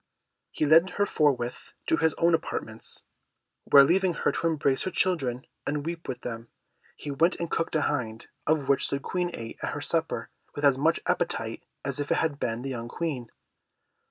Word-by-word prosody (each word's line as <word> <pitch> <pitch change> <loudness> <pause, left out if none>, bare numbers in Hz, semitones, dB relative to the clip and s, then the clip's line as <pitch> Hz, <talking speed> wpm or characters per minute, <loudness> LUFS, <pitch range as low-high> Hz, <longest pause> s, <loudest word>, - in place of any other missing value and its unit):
He - - -1
led 165 +5 +6
her 205 - +3
forthwith 130 -9 0
to 160 - +2
his 160 -2 +2
own 170 0 +3
apartments, 115 -8 -1 0.6
where 140 -1 +8
leaving 180 +4 +2
her - - +1
to 165 - -1
embrace 145 -4 +1
her - - -1
children 135 -11 0 0.2
and 145 0 -1
weep 170 0 -5
with 130 - -4
them, 115 -1 -6 0.5
he 145 - -6
went 165 +6 +3
and 170 -1 -4
cooked 165 -1 -1
a 155 - +3
hind, 115 -7 -2 0.2
of 150 -3 +2
which 140 -1 +3
the 140 - -1
Queen 180 +5 -2
ate 115 -1 -8
at - - -2
her - - -4
supper, - - 0 0.2
with 145 - -1
as 140 -2 +6
much 160 +5 +2
appetite - - -1 0.2
as 140 0 +1
if 145 - -2
it - - +3
had 155 -3 0
been 115 +1 -2
the 135 - -3
young 120 -2 -5
Queen. 130 -5 -4
145 Hz, 190 wpm, -27 LUFS, 130-165 Hz, 0.6 s, where